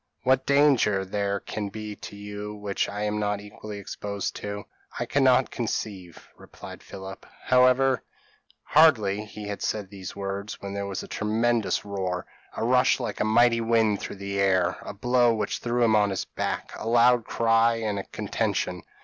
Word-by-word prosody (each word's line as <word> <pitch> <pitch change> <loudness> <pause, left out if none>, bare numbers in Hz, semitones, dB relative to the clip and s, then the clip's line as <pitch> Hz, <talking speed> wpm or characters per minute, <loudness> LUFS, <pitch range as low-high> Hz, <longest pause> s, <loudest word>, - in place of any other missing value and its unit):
p> - - -2
"What 130 0 +2
danger 135 -9 +4
there 100 +1 -1
can 105 -2 -4
be 105 +1 -6
to - - -9
you, 105 +1 -7
which 105 -1 -2
I 105 +1 -4
am 105 0 -1
not 105 -1 0
equally 105 0 -9
exposed 100 0 -5
to, 105 0 -5 0.3
I - - -1
cannot 130 -2 +3
conceive," 100 -7 -4
replied - - -11
Philip; 95 0 -9 0.2
"however 130 -1 +4 0.3
" - - -35
Hardly 110 -11 +5
had - - -16
he 105 -1 -5
said 105 -3 -3
these 95 -2 -8
words, 100 +1 -5
when 100 0 -6
there 100 0 -3
was 95 -1 -4
a - - -9
tremendous 110 0 0
roar 95 -3 -3 0.3
a - - -1
rush 125 +3 +3
like 120 - -4
a - - +2
mighty 115 +1 +4
wind 115 -2 +2
through - - -5
the 100 0 -4
air 95 -2 +2
a - - -7
blow 120 +1 +3
which 110 - -2
threw 120 0 0
him 110 -2 +4
on 105 -1 +4
his 95 -2 -2
back - - -4
a - - -5
loud 120 +1 +5
cry 115 0 +3
and 110 -3 -2
a - - -4
contention. 100 -4 -2
105 Hz, 180 wpm, -26 LUFS, 100-115 Hz, 0.3 s, Hardly